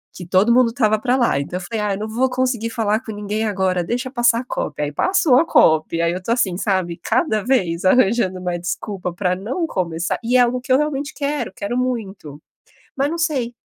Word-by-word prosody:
que 180 - -8
todo 190 +7 +3
mundo 250 -1 +4
estava 220 -2 +1
para 250 +3 +1
lá. 235 - +2
Então 155 +6 -4
eu - - -10
falei: 220 -2 -2
"Ah, 205 -1 0
eu - - -7
não 215 - -4
vou 245 +4 0
conseguir 250 -3 -1
falar 220 -2 0
com 220 - -7
ninguém 210 +1 -3
agora, 190 -3 0
deixa 245 +7 -3
passar 240 -2 +2
a 250 - -6
COP." 150 -10 -4
Aí 145 - -1
passou 355 - +3
a 325 - +4
COP, 160 - +3
e - - 0
aí 170 0 +1
eu 180 - -3
estou 230 +5 -1
assim, 190 -7 +1
sabe? 185 -4 -1
Cada 220 - +1
vez 185 -10 0
arranjando 190 -3 +2
uma 180 -1 -2
desculpa 180 +1 -4
para 180 0 0
não 255 - -3
começar 170 - -2
e 245 +2 +2
é - - +5
algo 245 +1 +2
que 255 0 -6
eu 260 - +6
realmente 295 0 -2
quero, 285 -5 -3
quero 220 +6 -4
muito, 200 - -4 0.5
mas 275 +2 0
não 335 - -3
sei. 275 -8 -1
220 Hz, 230 wpm, -20 LUFS, 185-255 Hz, 0.5 s, eu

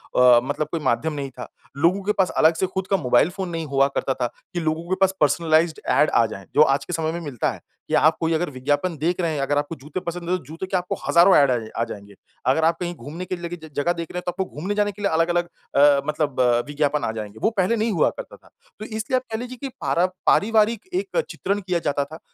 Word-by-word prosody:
अ, 125 -1 +7
मतलब 145 +3 -2
कोई 165 - -1
माध्यम 150 +6 0
नहीं 140 -2 -4
था। - - -6 0.3
लोगों 170 +6 +2
के 210 - +1
पास 185 - +4
अलग 160 +1 +5
से 190 - 0
खुद 190 0 -4
का 195 - +2
मोबाइल 125 +1 +3
फ़ोन 190 -2 -3
नहीं 165 -1 -3
हुआ 140 -1 +2
करता 135 - 0
था 125 -2 -1 0.3
कि 175 - -1
लोगों 160 +1 -2
के 185 - +2
पास 190 0 +4
पर्सनलाइज़्ड 160 +1 +2
ऐड 150 - +4
आ 115 - +3
जाएँ 100 -3 -7
जो 150 - +6
आज 135 -2 +3
के 175 - -6
समय 160 -1 -1
में 170 - -4
मिलता 140 -7 -2
है। - - -10 0.3
कि - - -5
आप 155 +1 +4
कोई 165 0 0
अगर 165 +1 0
विज्ञापन 145 +6 -1
देख 170 +5 -1
रहे 170 - 0
हैं, 150 - -2
अगर 145 +1 0
आपको 145 +3 -2
जूते 150 +6 -6
पसंद 170 0 -5
है 185 - +2
तो - - -13
जूते 165 +5 -6
के 190 - -3
आपको 180 0 -3
हज़ारों 175 +3 +6
ऐड 140 -2 +5
आ 125 - +2
जाए 110 -2 -7
आ 115 - +1
जाएँगे। 100 -2 -10 0.3
अगर 150 +5 +3
आप 165 0 +2
कहीं 175 -1 -3
घूमने 165 +4 -7
के 185 0 -3
लिए 170 -1 -6
ज 160 - -10
जगह 170 +5 +1
देख 170 -2 -6
रहे - - -6
हैं 180 - -2
तो - - +1
आपको 190 +2 -3
घूमने 185 +6 -4
जाने 205 0 +1
के 205 +1 -12
लिए 200 - +1
अलग-अलग 175 +2 +2 0.3
अ, 140 0 +6
मतलब 150 -3 -1 0.3
विज्ञापन 145 0 0
आ - - 0
जाएँगे। 110 -1 -7
वो 220 - +4
पहले 195 +4 +2
नहीं 225 0 0
हुआ 170 -6 +3
करता - - -8
था। - - -22 0.3
तो 215 - -6
इसलिए 220 +3 -1
आप 255 - -1
कह 220 - -1
लीजिए 250 +1 -7
कि 275 - -3
पारा 145 +4 +2 0.2
पारिवारिक 220 +1 +3
एक 390 +6 0
चित्रण 200 +1 -2
किया 180 -2 -1
जाता 145 0 0
था 155 +3 -11
165 Hz, 265 wpm, -23 LUFS, 145-185 Hz, 0.3 s, अ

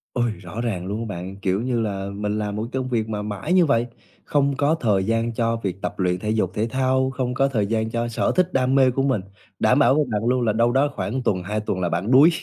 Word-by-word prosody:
Ôi, 120 -2 +1
rõ 100 +5 -6
ràng 95 -7 -2
luôn 105 +3 -3
á 115 - -3
bạn, 90 +3 -6
kiểu 95 +1 0
như 120 -1 -1
là, 100 -2 -3
mình 105 +1 -2
làm 105 -1 -2
một 105 - -2
cái 130 +3 -3
công 130 - -5
việc 110 -2 -1
mà 105 -1 -3
mãi 105 - -3
như 180 -2 +5
vậy, 120 -5 +2 0.4
không 140 -1 +1
có 145 +3 +2
thời 105 -7 +2
gian 115 +1 0
cho 115 0 0
việc 95 0 -3
tập - - -4
luyện 90 -1 +1
thể 105 - -3
dục 105 -4 0
thể 110 +3 -1
thao, 130 +1 +1
không 125 -1 -2
có 135 +2 +2
thời 110 -7 0
gian 110 0 0
cho 120 0 -1
sở 115 - 0
thích, 185 -1 +2
đam 130 0 +2
mê 130 -2 +5
của 135 +2 0
mình, 130 -7 +1 0.4
đảm 125 - +3
bảo 130 +1 +5
với 150 - +3
bạn 105 +1 -1
luôn 125 +1 +2
là 110 -3 +1
đâu 115 +2 +2
đó 135 +3 +2
khoảng 130 +5 -3
tuần, 95 -6 0
hai 105 +4 -2
tuần 105 -3 -3
là 90 -1 0
bạn 90 +8 -1
đuối, 140 +5 +8
115 Hz, 275 wpm, -23 LUFS, 105-130 Hz, 0.4 s, đuối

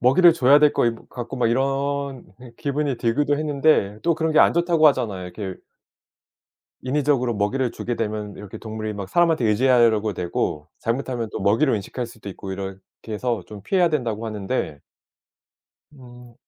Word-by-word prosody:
먹이를 170 +8 +6
줘야 145 -3 +5
될 150 -1 +5
것 - - +2
이 115 - +1
같고 120 0 -6
막 120 -2 +2
이런 135 +1 -1
네 125 -1 -13
기분이 145 -2 -1
들기도 145 +5 +1
했는데 145 -9 +2
또 170 0 +2
그런 160 0 -1
게 155 - +4
안 - - +6
좋다고 170 -2 +3
하잖아요. 110 -10 -1
이렇게 95 +1 -6 1.3
인위적으로 135 -2 +1
먹이를 115 +5 0
주게 120 - -4
되면 105 -2 -3
이렇게 100 -1 -9
동물이 110 -1 -5
막 100 -2 -6
사람한테 165 - +2
의지하려고 110 -2 +3
되고 85 -4 -2
잘못하면 120 -1 -2
또 - - -5
먹이를 110 +7 +3
인식할 120 +5 -5
수도 115 -3 -11
있고 95 0 -8
이렇게 95 0 -5 0.3
해서 115 -1 -2
좀 105 -2 -10
피해야 180 - +2
된다고 115 -8 -2
하는데 105 - -3 1.1
음 125 -2 -14
120 Hz, 360 characters per minute, -23 LUFS, 105-140 Hz, 1.3 s, 먹이를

